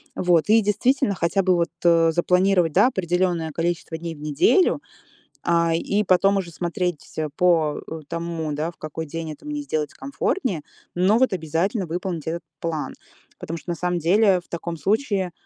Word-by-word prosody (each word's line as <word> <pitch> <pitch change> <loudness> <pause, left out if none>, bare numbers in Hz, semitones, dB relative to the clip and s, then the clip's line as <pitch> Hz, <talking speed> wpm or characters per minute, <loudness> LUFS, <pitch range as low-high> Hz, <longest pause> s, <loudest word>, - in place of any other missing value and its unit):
Вот. 175 +1 +2
И 225 +1 +6
действительно, 215 +3 +1
хотя 185 +3 +1
бы 185 -1 +3
вот, 170 -1 +1
э, 165 -1 +5
запланировать, 180 -1 +2
да, - - +5
определенное 175 -5 0
количество 165 0 -2
дней 165 0 -6
в 150 - -14
неделю, 150 - +3 0.6
а, 170 -1 +2
и 200 +5 0
потом 195 +2 +3
уже 175 -3 -5
смотреть 175 0 -2
всё 155 -1 -4
по, 165 -4 +2
э, 160 - -6
тому, 165 -2 -3
да, 155 +3 -2
в - - -22
какой 155 +1 -6
день 160 +1 -5
это 150 - -14
мне 295 -1 -3
сделать 155 - -2
комфортнее, 265 - -2 0.3
но 190 +6 +3
вот 260 -5 +3
обязательно 175 - -1
выполнить 175 -1 -4
этот 170 +1 -3 0.2
план. 160 -3 -3 0.4
Потому 165 +1 -5
что 175 - -8
на 170 - -2
самом 180 +1 -1
деле 190 +3 +4
в 175 - -27
таком 170 0 -5
случае, 195 - 0
175 Hz, 175 wpm, -23 LUFS, 165-190 Hz, 0.6 s, И